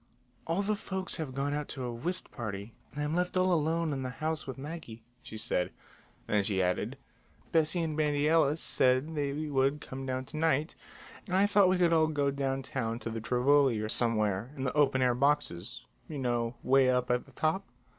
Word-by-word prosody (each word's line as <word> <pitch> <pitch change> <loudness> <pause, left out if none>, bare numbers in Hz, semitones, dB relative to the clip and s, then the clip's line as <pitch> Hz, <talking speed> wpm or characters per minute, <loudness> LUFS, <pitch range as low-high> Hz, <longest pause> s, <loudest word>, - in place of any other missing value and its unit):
"All 170 +5 +1
the 210 +1 +1
folks 190 -2 -3
have 150 -6 -5
gone 140 +1 -1
out 150 0 -2
to 130 - -6
a 120 -1 -3
whist 175 +10 -3
party, 105 -2 -6 0.2
and 145 - -4
I'm 150 +1 -1
left 180 +1 0
all 185 0 +3
alone 160 0 +1
in 135 - -3
the 130 - -3
house 155 +4 -3
with 130 - -5
Maggie," 135 -6 -8 0.2
she 110 - -9
said. 90 -4 -1 0.5
Then 105 -1 +1
she 95 -1 -1
added: 90 -1 0 0.5
"Bessie 165 +2 +2
and 155 -2 -2
Bandy 150 -1 +1
Ellis 160 -1 +3
said 130 +5 +2
they 145 -2 -1
would 145 -1 0
come 135 -1 -7
down 130 0 -2
to 155 - -8
night, 155 -1 +1 0.5
and 185 -1 +1
I 195 - +5
thought 205 -2 +5
we 185 - +3
could 175 -2 +3
all 160 -1 +4
go 145 -3 +1
downtown 135 -4 -2
to 115 - -5
the 115 0 -4
Tivoli 130 +1 +3
or 110 0 -3
somewhere, 110 -2 +1
in 130 - -3
the 130 - -1
open 140 -3 +3
air 125 -1 +3
boxes, 125 -4 0 0.2
you 155 - -5
know, 120 -2 -1
way 135 0 +4
up 125 -1 +1
at 125 0 0
the - - -18
top." 160 +5 0
140 Hz, 205 wpm, -30 LUFS, 125-155 Hz, 0.5 s, I